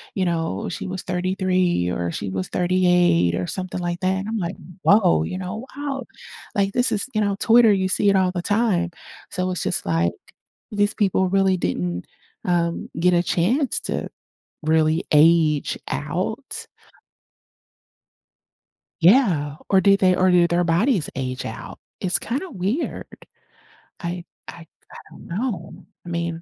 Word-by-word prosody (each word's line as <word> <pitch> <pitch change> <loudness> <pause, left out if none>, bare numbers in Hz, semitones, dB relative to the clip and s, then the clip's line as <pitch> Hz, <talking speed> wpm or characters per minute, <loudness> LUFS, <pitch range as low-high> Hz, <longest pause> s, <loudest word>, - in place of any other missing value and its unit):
you 190 - 0
know, 165 - -2
"she - - -5
was 185 -1 -5
33," 185 - 0
or 85 -1 -2
"she 100 - -4
was 95 -1 -3
38," 180 - +3
or 90 0 -2
something 185 -1 -4
like 175 +1 -3
that, 185 0 +1
and 195 - -5
I'm 225 - -2
like, 180 -1 -3 0.3
"Whoa," 200 -4 +4
you 185 - -4
know, 190 +6 -5
"wow!" 280 -2 -3 0.5
Like, 200 -1 +1
this 245 +1 +2
is, 205 - 0
you 215 - +1
know, 200 -1 +1
on 195 - -3
Twitter, 230 0 +5
you 190 -1 +1
see 200 +2 +3
it 200 - +3
all 185 -1 +2
the 175 - -2
time. 205 -5 +1 0.4
So 185 0 -1
it's 180 - -2
just 180 - 0
like, 85 0 +1 0.6
these 205 0 +1
people 190 -3 +1
really 190 0 +2
didn't, 90 - -2 0.4
um, 170 -1 0
get 180 +1 +3
a 175 0 +3
chance 235 - +1
to - - -3 0.5
really 160 +1 +2
age 155 -1 +4
out. - - -4 2.4
Yeah. 170 - +4
Or 190 -1 +4
did 195 +1 +4
they 185 -1 +4
or 185 0 +3
did 175 -1 +4
their 175 +1 +2
bodies 175 - +1
age 130 -1 -4
out? - - -8 0.2
It's 180 -2 +3
kinda 280 - -3
weird. 210 - -2 0.9
I 175 -1 -5 0.2
I - - -9 0.3
I - - -11
don't - - -13
know. 185 -2 -4 0.2
I - - -8
mean 170 -1 -3
180 Hz, 155 wpm, -22 LUFS, 170-200 Hz, 2.4 s, Twitter